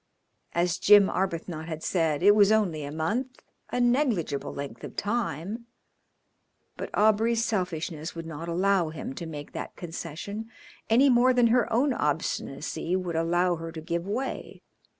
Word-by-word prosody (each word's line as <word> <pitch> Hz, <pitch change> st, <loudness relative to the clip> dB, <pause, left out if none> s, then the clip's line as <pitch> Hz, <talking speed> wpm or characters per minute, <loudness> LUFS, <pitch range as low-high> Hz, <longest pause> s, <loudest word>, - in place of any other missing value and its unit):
As 175 Hz, 0 st, +1 dB
Jim 205 Hz, -1 st, +6 dB
Arbuthnot 170 Hz, -3 st, -3 dB
had 160 Hz, -1 st, -5 dB
said, 165 Hz, -3 st, 0 dB
it 205 Hz, +1 st, +8 dB
was 205 Hz, -1 st, +5 dB
only 185 Hz, -9 st, +1 dB
a 145 Hz, -, -5 dB
month, 225 Hz, -, -3 dB, 0.3 s
a 245 Hz, -, -2 dB
negligible 240 Hz, -, +1 dB
length 140 Hz, -5 st, -7 dB
of -, -, -8 dB
time, 210 Hz, 0 st, -3 dB, 1.1 s
but -, -, -5 dB
Aubrey's 220 Hz, +2 st, +3 dB
selfishness 170 Hz, -5 st, -3 dB
would 165 Hz, 0 st, -6 dB
not 165 Hz, +1 st, -7 dB
allow 185 Hz, 0 st, +2 dB
him 155 Hz, -4 st, -6 dB
to 170 Hz, -, -6 dB
make 145 Hz, -2 st, -7 dB
that -, -, -6 dB
concession 175 Hz, +6 st, -6 dB, 0.4 s
any 245 Hz, +5 st, +5 dB
more 250 Hz, +1 st, +5 dB
than 245 Hz, -1 st, +4 dB
her 245 Hz, -3 st, +2 dB
own 255 Hz, +4 st, +2 dB
obstinacy 150 Hz, -, -2 dB
would 180 Hz, -3 st, -2 dB
allow 175 Hz, +2 st, +2 dB
her 165 Hz, 0 st, -6 dB
to 160 Hz, -, -7 dB
give 170 Hz, +3 st, -3 dB
way. 250 Hz, +7 st, -4 dB
180 Hz, 150 wpm, -27 LUFS, 160-220 Hz, 1.1 s, it